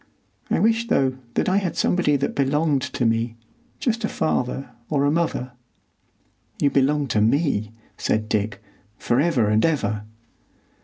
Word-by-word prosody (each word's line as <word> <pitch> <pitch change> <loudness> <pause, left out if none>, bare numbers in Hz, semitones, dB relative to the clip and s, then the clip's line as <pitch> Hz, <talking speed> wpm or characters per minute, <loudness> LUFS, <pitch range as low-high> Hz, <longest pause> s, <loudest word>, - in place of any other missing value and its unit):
I - - +2
wish, 225 +1 +2
though, 135 - +2 0.2
that - - +1
I 185 - +3
had 190 -4 -1
somebody 175 -5 +2
that 140 0 -1
belonged 140 +1 +1
to 125 - -2
me,—just 115 - -3
a 215 - 0
father 135 -3 -1 0.2
or 140 -2 +1
a 145 - +3
mother." 155 -6 -1 1.1
"You 140 - +3
belong 140 +1 +2
to 105 - +2
me," 110 -3 +1 0.3
said 110 0 0
Dick, 105 -1 -2 0.3
"for 120 - +1
ever 140 -8 +2
and 105 +1 +2
ever." 110 -10 0
140 Hz, 145 wpm, -23 LUFS, 115-160 Hz, 1.1 s, I